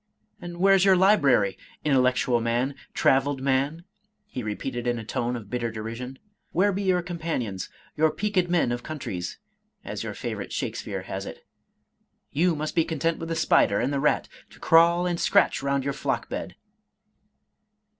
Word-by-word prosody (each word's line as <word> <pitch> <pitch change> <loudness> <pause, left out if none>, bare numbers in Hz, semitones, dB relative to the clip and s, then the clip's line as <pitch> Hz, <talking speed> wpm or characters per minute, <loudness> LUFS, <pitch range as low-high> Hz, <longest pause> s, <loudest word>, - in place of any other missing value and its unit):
And 175 0 -7
where's 195 +1 +5
your 195 -1 +6
library, 140 - +4
— - - -29
intellectual 125 -3 +3
man, 120 +4 0
— - - -39
^traveled 135 +1 +2
man?" 140 +5 0 0.4
he 165 -11 -6
re 105 -2 -3
peated 120 0 -4
in 120 0 +1
a 115 - -5
tone 120 +2 -2
of 105 -4 -8
bitter 120 -1 -1
derision; 115 +4 -6 0.2
" - - -48
where 200 +4 +3
be 195 - -2
your 185 -3 +2
com 175 -1 -6
panions, 120 - -3 0.3
your 155 +1 +3
peaked 185 0 0
men 170 -8 +2
of 120 0 -2
countries, 100 - -5 0.5
as - - -5
your - - -5
favorite - - -5
Shakespeare - - -4
has - - -5
it? - - -10 0.9
You 165 +3 +2
must 155 +1 -3
be 165 - +3
content 165 +1 -1
with 165 - -5
the 165 - -1
spider 160 - +3
and 130 +4 0
the 140 - 0
rat, 150 +2 +1 0.2
to - - -17
crawl 170 +2 +5
and 175 -1 -1
scratch - - +3
round 140 0 0
your 140 +1 -1
flock - - -2
bed 90 - -5
140 Hz, 180 wpm, -26 LUFS, 120-170 Hz, 0.9 s, your